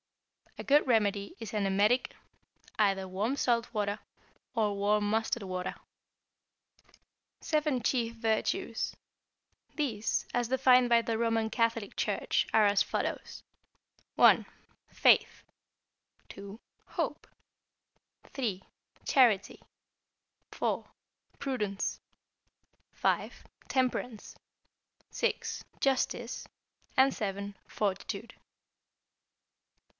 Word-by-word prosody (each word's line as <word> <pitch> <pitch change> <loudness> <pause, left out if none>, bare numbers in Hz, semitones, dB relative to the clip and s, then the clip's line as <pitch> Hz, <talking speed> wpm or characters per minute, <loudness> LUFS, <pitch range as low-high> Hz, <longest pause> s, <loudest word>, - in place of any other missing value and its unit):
A - - -6
good 290 +2 +4
remedy 205 -4 +1
is 225 -2 -7
an 210 -2 0
emetic, 205 +6 +2 0.6
either 195 -3 +2
warm 205 +8 -1
salt 240 -4 +1
water, 205 -2 -1 0.6
or 210 -3 +1
warm 205 +1 +1
mustard 225 +1 0
water. 185 -1 -4 1.6
=Seven 300 -5 0
Chief 230 -1 0
Virtues.= 225 -1 -1 0.8
These, 230 -8 -1
as 245 -1 0
defined 255 -1 +5
by 235 -1 +5
the 230 -1 -1
Roman 225 -1 +1
Catholic 230 -3 0
Church, - - 0
are 220 -1 +5
as 200 -1 +4
follows: - - -4 0.7
(1) - - +6 0.4
Faith, - - +3 0.9
(2) 200 +2 -9 0.3
Hope, - - -3 1.0
(3) 210 -8 -3 0.4
Charity, 230 -8 +3 0.9
(4) - - -2 0.5
Prudence, 210 -8 -2 0.9
(5) - - -1 0.2
Temperance, 250 -3 -1 0.8
(6) - - -2 0.2
Justice, 255 -3 -1 0.6
(7) 200 -4 -4
Fortitude. 205 +3 -3
225 Hz, 85 wpm, -30 LUFS, 200-245 Hz, 1.6 s, 1